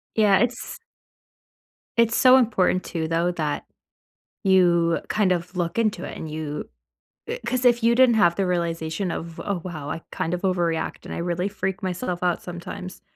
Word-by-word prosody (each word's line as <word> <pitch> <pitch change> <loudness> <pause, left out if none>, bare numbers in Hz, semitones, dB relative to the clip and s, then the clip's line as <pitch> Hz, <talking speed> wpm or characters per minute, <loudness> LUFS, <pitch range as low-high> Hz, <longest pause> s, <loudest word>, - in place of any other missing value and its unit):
Yeah, 205 -3 +5
it's 240 +2 -2 1.2
it's 230 -1 +4
so 255 0 +7
important 190 -7 +2
too, 160 -2 -3
though, 165 +2 +1
that 155 -4 -3 0.8
you 175 -3 +4
kind 205 -3 +2
of 180 +1 -2
look 175 +4 -1
into 215 -5 0
it, - - -6
and 160 - -6
you 150 -1 -5 0.6
uh, - - -1
'cause 255 -1 -1
if 240 -1 +4
you 235 +1 +4
didn't 250 -2 +5
have 175 -5 +4
the 195 - 0
realization 170 0 -1
of, 165 0 -6
"Oh, 195 -4 -3
wow. 155 -5 -6
I 165 - -4
kind 165 - -2
of 180 - -2
overreact 175 -4 -1
and - - -6
I - - -4
really 175 +2 -1
freak 195 0 -3
myself 180 -1 -3
out 175 -1 +1
sometimes," 175 +1 -8
180 Hz, 175 wpm, -24 LUFS, 170-205 Hz, 1.2 s, so